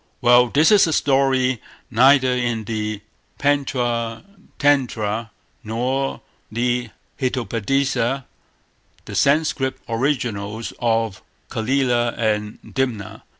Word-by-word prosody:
Well, 120 0 +5
this 150 - +4
is 205 -4 +6
a 160 - 0
story 135 -4 +2 0.3
neither 130 +2 +5
in 120 -3 -1
the 105 -1 -3 0.4
Pantcha 120 -5 0 0.3
Tantra 115 -6 +1 0.3
nor 125 +5 -2 0.3
the 120 +1 -1 0.3
Hitopadesa, 130 +1 0 0.8
the - - -8
Sanscrit 140 -2 +2
originals 115 -4 -2
of 115 -3 0 0.3
Calila 120 0 +1
and 105 -2 -1
Dimna. 125 -7 -3
120 Hz, 90 wpm, -21 LUFS, 115-135 Hz, 0.8 s, is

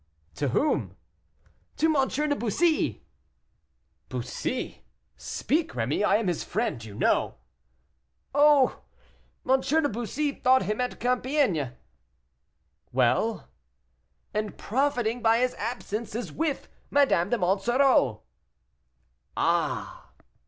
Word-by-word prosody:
"To 145 - -2
whom?" 280 - 0 0.8
"To 315 0 +2
M. 270 -2 +3
de 295 +1 0
Bussy." 310 - 0 1.0
"Bussy! - - -4 0.3
speak, 315 +3 -2
Rémy; 125 - -1
I - - +4
am 225 - -2
his 175 -4 -1
friend, 175 - -2
you 105 -2 -10
know." - - +1 1.0
"Oh! 290 -2 +4 0.7
M. 265 +1 +4
de 295 +3 +2
Bussy 255 +5 -2
thought 260 -2 +3
him 210 +5 -2
at 250 - -3
Compiègne." 250 - 0 1.2
"Well?" 65 - +1 0.9
"And, 215 -1 -3
profiting 245 -1 0
by 225 0 +4
his 250 +1 +1
absence, 225 -1 -4
is 235 - -4
with 315 -3 -2 0.2
Madame 200 -11 +3
de 240 - +1
Monsoreau." 195 - +2 1.1
"Ah!" - - -1
240 Hz, 105 wpm, -27 LUFS, 200-280 Hz, 1.2 s, I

